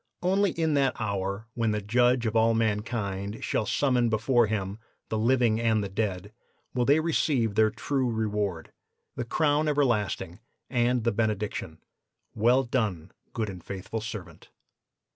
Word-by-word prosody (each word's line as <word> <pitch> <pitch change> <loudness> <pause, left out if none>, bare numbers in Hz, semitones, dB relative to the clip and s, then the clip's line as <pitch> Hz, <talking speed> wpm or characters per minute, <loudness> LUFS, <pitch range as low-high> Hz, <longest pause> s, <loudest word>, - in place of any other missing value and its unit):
Only 195 +2 +3
in 160 -2 0
that 140 -2 +1
hour 100 -1 -2
when 115 -2 0
the 105 - 0
Judge 120 +3 +3
of 110 0 -1
all 115 0 +4
mankind 105 -2 -2
shall 105 - -1
summon 125 -4 +2
before 120 +1 +3
Him 100 -1 -3 0.3
the 110 - -1
living 120 -1 +3
and 110 -2 +2
the 100 - -4
dead 100 -1 -3 0.4
will 125 -1 +1
they 145 +4 +5
receive 145 -8 +1
their 110 +1 +4
true 130 +3 -1
reward, 105 -6 -2 0.4
the 120 - -2
crown 150 +3 +1
everlasting, 125 -9 0 0.3
and 120 -1 +2
the 115 - +2
benediction: 105 -6 -2 0.5
'Well 120 +5 +3
done, 105 -9 -2 0.2
good 110 -2 -2
and 90 -4 -8
faithful 100 +3 -5
servant. 95 -7 -8
110 Hz, 145 wpm, -27 LUFS, 105-125 Hz, 0.5 s, they